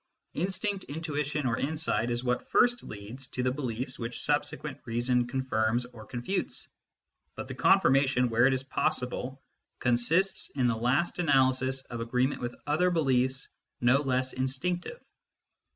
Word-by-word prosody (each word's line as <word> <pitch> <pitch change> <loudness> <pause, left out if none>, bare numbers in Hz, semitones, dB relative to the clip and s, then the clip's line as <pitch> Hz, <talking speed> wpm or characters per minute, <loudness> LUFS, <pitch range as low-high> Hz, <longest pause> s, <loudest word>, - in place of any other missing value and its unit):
Instinct, 195 +3 -2
intuition, 150 -1 -3
or 115 -2 0
insight 150 -5 0
is 120 0 -1
what 125 -1 -1
first 245 0 +4
leads 110 +6 -8
to 125 - -3
the 130 - +2
beliefs 130 -2 -4
tfhich 115 0 -5
subsequent - - -2
reason 120 +1 +1
confirms 120 -2 0
or 115 -3 -12
confutes; 125 +11 -3 0.7
but - - -6
the - - -5
Confirmation, 135 -8 +4
where 120 +2 +4
it 135 - +3
is 130 - -3
possible, 130 0 -2 0.3
consists, 130 +11 +2
in 130 -3 +1
the 120 -2 +2
last 125 +11 +1
analysis, 130 -4 +2
of 120 -2 -6
agreement 125 +4 0
with 120 -1 -4
other 155 +5 +2
beliefs 130 -5 +1 0.3
no 125 +2 +4
less 130 -2 0
in 130 0 -1
stinctive. 175 - -2
130 Hz, 145 wpm, -29 LUFS, 120-145 Hz, 0.7 s, first